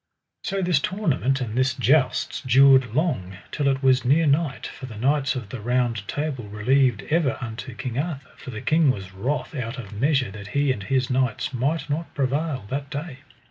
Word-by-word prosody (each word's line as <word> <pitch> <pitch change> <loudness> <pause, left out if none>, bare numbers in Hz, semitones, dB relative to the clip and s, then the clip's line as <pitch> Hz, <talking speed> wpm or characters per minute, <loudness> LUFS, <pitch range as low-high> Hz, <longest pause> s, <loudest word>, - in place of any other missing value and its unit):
So 195 -2 -1
this 175 -5 +3
tournament 140 -7 0
and 115 -3 -3
this 130 0 +2
jousts 130 +2 +2
dured 130 -2 +5
long, 125 - -1
till 145 -2 0
it 135 0 +1
was 130 -1 +4
near 145 +6 +3
night, 145 -1 +1
for 130 - -8
the 110 -4 -9
knights 140 +4 +1
of 120 -6 -5
the 120 0 -6
Round 120 -2 0
Table 145 -5 -3
relieved 115 +2 +2
ever 155 -4 +2
unto 120 +1 -6
King 125 0 -4
Arthur; 145 -3 -4
for - - -10
the 110 -3 -6
king 160 -2 +3
was 95 -6 -2
wroth 125 +10 -2
out 125 -3 -4
of 110 -5 -8
measure 135 +1 +1
that 100 0 -9
he 140 -1 +3
and 120 -6 -3
his 130 +4 0
knights 130 -1 0
might 140 +7 -1
not 155 +3 -3
prevail 140 -2 -1
that 140 +1 -3
day. 145 -1 -6
130 Hz, 190 wpm, -24 LUFS, 120-145 Hz, -, dured